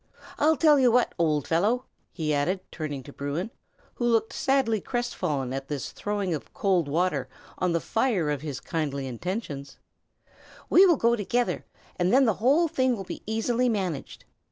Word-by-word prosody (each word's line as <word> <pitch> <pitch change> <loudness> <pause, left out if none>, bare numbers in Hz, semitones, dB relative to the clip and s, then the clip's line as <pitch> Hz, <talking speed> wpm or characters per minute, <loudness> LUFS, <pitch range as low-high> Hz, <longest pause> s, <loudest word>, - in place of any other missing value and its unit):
I'll 310 +1 +4
tell 300 -3 +5
you 250 -2 +5
what, 245 +1 +3
old 150 -4 +1
fellow!" 210 +10 +1 0.3
he 155 -3 -2
added, 175 +7 0
turning 145 -4 -5
to 140 - -12
Bruin, 145 +9 -3 0.4
who 240 - -3
looked 225 -1 +2
sadly 265 -6 +1
crestfallen 155 - -2
at 135 0 -4
this 145 -3 -4
throwing 205 -3 -2
of 155 - -7
cold 185 -6 +1
water 150 -4 0 0.3
on 180 -1 +1
the 170 - +2
fire 205 - 0
of 145 -2 -2
his 145 -4 -5
kindly 145 -4 -3
intentions, 140 - -5 0.9
"we 385 +2 +8
will 340 -4 +4
go 235 0 +3
together, 240 +3 -1 0.3
and 180 0 +1
then 265 +2 +5
the 220 - +3
whole 290 +8 +4
thing 260 -5 +1
will 195 - -6
be - - -7
easily 235 +3 +1
managed. 185 - -3
190 Hz, 170 wpm, -26 LUFS, 150-240 Hz, 0.9 s, we